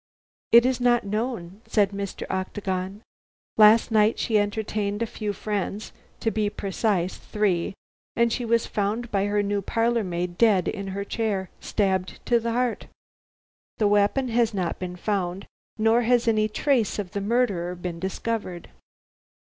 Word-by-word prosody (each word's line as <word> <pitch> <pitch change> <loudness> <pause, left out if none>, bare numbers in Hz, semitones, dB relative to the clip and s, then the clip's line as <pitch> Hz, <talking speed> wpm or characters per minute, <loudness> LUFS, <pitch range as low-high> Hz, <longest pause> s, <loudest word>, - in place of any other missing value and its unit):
"It 235 +1 +8
is 255 -1 +1
not 240 -1 +3
known," 210 -2 -3
said 205 -2 +2
Mr. 200 -1 -5
Octagon. 190 +1 -3 0.5
"Last 220 +2 +6
night 215 0 +4
she 220 -2 +2
entertained 205 0 -1
a - - +1
few 210 -1 -4
friends 205 0 -3 0.3
to 225 - +1
be 215 -2 0
precise, 195 -2 -1
three, 195 -4 -1 0.4
and 235 -1 +2
she 250 - -2
was 230 0 +2
found 215 +4 -2
by 195 -1 +1
her 205 0 +1
new 200 0 -1
parlor 230 +3 +1
maid 175 -1 -3
dead 210 -6 +4
in 200 -1 -3
her 200 +1 -4
chair, 200 -5 -2
stabbed 190 -3 -1
to 240 -1 +3
the 230 0 -2
heart. 245 -1 -1 0.9
The 215 - +3
weapon 205 +6 +2
has 230 -2 +1
not 180 -3 -2
been 180 -1 -5
found, 190 -1 -2 0.3
nor 225 +2 +3
has 240 0 +2
any 215 -1 +3
trace 245 -2 +1
of 195 -4 -4
the 200 - -3
murderer 200 -6 0
been 175 -1 -5
discovered." 190 -1 -4
210 Hz, 155 wpm, -25 LUFS, 195-230 Hz, 0.9 s, It